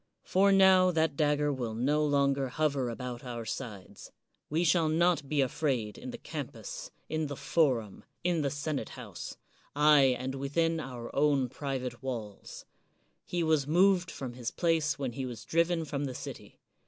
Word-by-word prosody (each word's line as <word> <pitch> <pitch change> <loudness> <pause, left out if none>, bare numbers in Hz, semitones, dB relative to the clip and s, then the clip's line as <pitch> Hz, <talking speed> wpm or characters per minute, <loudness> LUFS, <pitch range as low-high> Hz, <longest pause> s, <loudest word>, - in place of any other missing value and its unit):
For 195 +2 +3
now 190 -1 +6
that 160 -4 +1
dagger 150 0 +2
will 120 -4 -3
no 145 +6 +1
longer 140 -2 +2
hover 140 -2 0
about 125 0 -6
our 120 -2 -5
sides; 110 -4 -7 0.4
we 160 +3 +1
shall 165 -2 +3
not 165 -3 +2
be 150 -2 +2
afraid 130 -5 -1
in 255 - -8
the 240 - -6
campus, - - -7 0.2
in 155 -1 -1
the 140 - -5
forum, 125 - 0 0.2
in 175 -2 +1
the 140 - 0
senate 145 +1 -3
house, - - -8 0.2
— - - -34
aye, 145 -3 +6
and 130 +1 -4
within 165 +5 0
our 125 -5 -7
own 140 -3 +3
private 130 -3 -4
walls. 115 -6 -6 0.6
He 175 -1 -1
was 155 -4 +2
moved 180 +2 +4
from 130 -3 -6
his 120 -1 -4
place 165 -3 +1
when 135 -3 -2
he 130 +1 -4
was 120 -2 -8
driven 170 0 +1
from 145 -1 -3
the 130 -2 -5
city. - - -8
145 Hz, 165 wpm, -30 LUFS, 130-165 Hz, 0.6 s, now